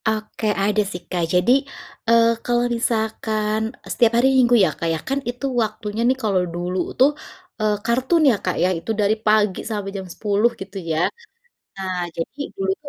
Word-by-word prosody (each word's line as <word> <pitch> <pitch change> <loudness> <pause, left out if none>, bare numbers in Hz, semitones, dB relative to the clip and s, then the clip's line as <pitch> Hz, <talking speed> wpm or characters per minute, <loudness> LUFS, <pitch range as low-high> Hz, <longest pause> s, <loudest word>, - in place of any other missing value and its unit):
Oke, 220 0 -2 0.2
ada 210 +1 +2
sih, 180 - -6
Kak, 175 -2 -1
jadi, 180 +7 +3 0.6
eee, 230 0 +6 0.2
kalau 240 0 +2
misalkan 220 -2 -1 0.3
setiap 235 -1 +3
hari 245 +3 +4
minggu 245 -1 +5
ya, - - -1
Kak, 165 - -1
ya - - -1
kan 275 +1 +1
itu 245 +3 -4 0.2
waktunya 215 0 -4
nih 260 - +2
kalau 195 -4 +2
dulu 175 +1 -3 0.2
tuh, 265 +3 +5 0.5
eee, 215 -1 +2
kartun 260 +8 +2
ya, 240 - +4
Kak, 185 - 0
ya 180 - +3
itu 165 - -4
dari 205 +1 +3
pagi 210 -3 +3
sampai 205 -3 -3
jam 190 -1 -6
10 210 +2 +2
gitu 195 +1 -7
ya. 165 -1 0 0.7
Nah, 190 -1 -3 0.2
jadi 165 - -5 0.2
dulu 190 0 -1
tuh 295 - -11
215 Hz, 175 wpm, -21 LUFS, 190-235 Hz, 0.7 s, eee